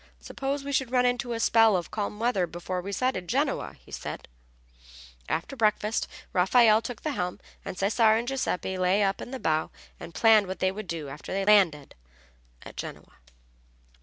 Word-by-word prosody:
"Suppose 275 Hz, +1 st, -4 dB
we 280 Hz, -, -5 dB
should 265 Hz, -3 st, 0 dB
run 250 Hz, 0 st, +2 dB
into 245 Hz, 0 st, 0 dB
a 230 Hz, -, -3 dB
spell 225 Hz, -3 st, +5 dB
of 175 Hz, -3 st, -5 dB
calm 210 Hz, 0 st, -3 dB
weather 220 Hz, -6 st, +1 dB
before 175 Hz, +2 st, -4 dB
we 195 Hz, +3 st, -6 dB
sighted 200 Hz, -4 st, -1 dB
Genoa," -, -, -1 dB, 0.2 s
said -, -, -6 dB
he. -, -, -30 dB, 0.4 s
After 170 Hz, -, -2 dB
breakfast 215 Hz, -2 st, +1 dB, 0.3 s
Raffaelle 215 Hz, +4 st, +5 dB
took 230 Hz, 0 st, -7 dB
the 310 Hz, -, -1 dB
helm 180 Hz, -9 st, -3 dB, 0.2 s
and -, -, -6 dB
Cesare 220 Hz, +3 st, +3 dB
and 235 Hz, +1 st, -3 dB
Giuseppe 190 Hz, -8 st, -2 dB
lay 185 Hz, +3 st, +3 dB
up 195 Hz, 0 st, 0 dB
in -, -, -7 dB
the 265 Hz, -, -5 dB
bow 155 Hz, -5 st, 0 dB, 0.3 s
and 170 Hz, -, -10 dB
planned 220 Hz, -3 st, +5 dB
what 185 Hz, 0 st, -5 dB
they 185 Hz, +2 st, +1 dB
would 205 Hz, 0 st, -7 dB
do 160 Hz, -4 st, -5 dB
after 140 Hz, -, -9 dB
they 195 Hz, 0 st, -1 dB
landed 185 Hz, -9 st, +3 dB, 0.7 s
at -, -, -12 dB
Genoa. -, -, -8 dB
205 Hz, 180 wpm, -27 LUFS, 180-235 Hz, 0.7 s, spell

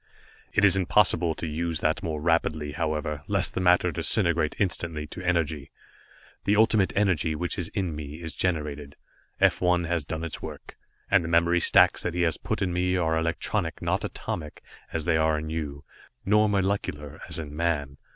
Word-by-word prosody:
"It 105 Hz, -, +3 dB
is 95 Hz, -2 st, +6 dB
impossible 90 Hz, -3 st, +3 dB
to -, -, -5 dB
use 80 Hz, 0 st, -2 dB
that 80 Hz, 0 st, +1 dB
more 80 Hz, -2 st, -3 dB
rapidly, 80 Hz, -2 st, 0 dB
however, 75 Hz, -1 st, -2 dB
lest -, -, +2 dB
the -, -, -2 dB
matter 90 Hz, 0 st, +4 dB
disintegrate 85 Hz, -1 st, +1 dB
instantly 85 Hz, -5 st, -2 dB
to 80 Hz, -, -9 dB
energy. 80 Hz, -5 st, -1 dB, 0.8 s
The 100 Hz, -, +3 dB
Ultimate 110 Hz, -2 st, +3 dB
Energy 90 Hz, -6 st, +1 dB
which 90 Hz, +5 st, -3 dB
is 85 Hz, -, -1 dB
in 90 Hz, -6 st, -1 dB
me 75 Hz, +1 st, -7 dB
is 80 Hz, -2 st, -7 dB
generated. 75 Hz, -5 st, -2 dB, 0.4 s
F -, -, +3 dB
1 90 Hz, -1 st, +2 dB
has 85 Hz, -1 st, -1 dB
done 80 Hz, +2 st, -5 dB
its 85 Hz, -, -6 dB
work, -, -, -9 dB, 0.4 s
and 100 Hz, -3 st, +5 dB
the -, -, -4 dB
memory 85 Hz, +1 st, +3 dB
stacks -, -, +5 dB
that 90 Hz, -, -2 dB
he 90 Hz, -, +1 dB
has 80 Hz, -2 st, +1 dB
put -, -, -2 dB
in 90 Hz, -2 st, -1 dB
me 90 Hz, +1 st, +1 dB
are 80 Hz, -2 st, +1 dB
electronic, 80 Hz, +1 st, -1 dB
not -, -, -1 dB
atomic, 75 Hz, -3 st, -5 dB, 0.3 s
as 80 Hz, -2 st, -2 dB
they 80 Hz, -2 st, +2 dB
are 80 Hz, 0 st, +2 dB
in 80 Hz, +1 st, -5 dB
you, 75 Hz, -3 st, -4 dB, 0.4 s
nor 105 Hz, +1 st, +4 dB
molecular 95 Hz, -7 st, -2 dB
as -, -, -3 dB
in 75 Hz, -2 st, -6 dB
man. 75 Hz, -4 st, -1 dB
85 Hz, 180 wpm, -26 LUFS, 75-90 Hz, 0.8 s, is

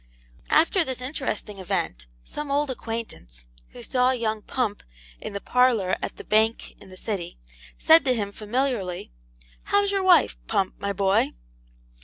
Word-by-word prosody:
After 335 Hz, +3 st, +4 dB
this 260 Hz, -4 st, -3 dB
interesting 255 Hz, -6 st, -4 dB
event, -, -, -3 dB, 0.2 s
some 295 Hz, -1 st, -6 dB
old 285 Hz, 0 st, +1 dB
acquaintance, 225 Hz, -, -6 dB, 0.2 s
who -, -, -11 dB
saw 250 Hz, 0 st, +2 dB
young 225 Hz, -4 st, -1 dB
Pump 225 Hz, -3 st, -2 dB, 0.4 s
in -, -, -6 dB
the 200 Hz, -, -3 dB
parlour 235 Hz, -6 st, +2 dB
at -, -, -5 dB
the -, -, -8 dB
bank 220 Hz, +1 st, +1 dB
in -, -, -14 dB
the 185 Hz, -, -12 dB
City, 190 Hz, -6 st, -4 dB, 0.4 s
said 320 Hz, +1 st, +6 dB
to 255 Hz, -2 st, +3 dB
him, 205 Hz, -3 st, -2 dB
familiarly, 210 Hz, -, -2 dB, 0.5 s
'How's 405 Hz, 0 st, +3 dB
your 395 Hz, -1 st, +1 dB
wife, 365 Hz, -3 st, +5 dB
Pump, 195 Hz, -3 st, 0 dB
my 200 Hz, -, -2 dB
boy?' 195 Hz, -, +1 dB
225 Hz, 150 wpm, -25 LUFS, 200-265 Hz, 0.5 s, said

